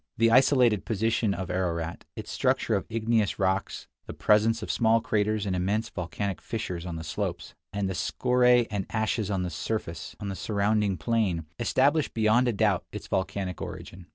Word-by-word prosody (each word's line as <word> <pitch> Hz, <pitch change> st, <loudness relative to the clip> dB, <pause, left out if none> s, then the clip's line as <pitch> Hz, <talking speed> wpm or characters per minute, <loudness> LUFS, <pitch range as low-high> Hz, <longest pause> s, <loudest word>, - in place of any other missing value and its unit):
The 115 Hz, 0 st, +4 dB
isolated 125 Hz, -4 st, +4 dB
position 110 Hz, -1 st, 0 dB
of 95 Hz, -2 st, -4 dB
Ararat, 85 Hz, -2 st, -2 dB
its -, -, -7 dB
structure -, -, +1 dB
of -, -, -1 dB
igneous 110 Hz, -1 st, +1 dB
rocks, 95 Hz, 0 st, -1 dB, 0.2 s
the -, -, -7 dB
presence 110 Hz, +2 st, +3 dB
of -, -, -2 dB
small 115 Hz, 0 st, +3 dB
craters 105 Hz, -1 st, 0 dB
and 95 Hz, -2 st, -1 dB
immense 105 Hz, +6 st, 0 dB
volcanic 95 Hz, +2 st, -4 dB
fissures 90 Hz, -6 st, -4 dB
on 85 Hz, -2 st, -4 dB
its 80 Hz, -1 st, -7 dB
slopes, -, -, -4 dB, 0.2 s
and 100 Hz, -1 st, -1 dB
the 95 Hz, -, -2 dB
scoria? 125 Hz, -, +3 dB
and 100 Hz, -2 st, -2 dB
ashes 110 Hz, -2 st, -1 dB
on 95 Hz, -3 st, 0 dB
the 90 Hz, -, -3 dB
surrounding 100 Hz, +2 st, -2 dB
plain, 95 Hz, -3 st, 0 dB
establish 140 Hz, +6 st, +2 dB
beyond 110 Hz, +3 st, +3 dB
a 120 Hz, -, +1 dB
doubt 105 Hz, -3 st, +2 dB
its -, -, -7 dB
volcanic 95 Hz, -1 st, -2 dB
origin. 90 Hz, 0 st, -8 dB
105 Hz, 160 wpm, -27 LUFS, 95-115 Hz, 0.2 s, The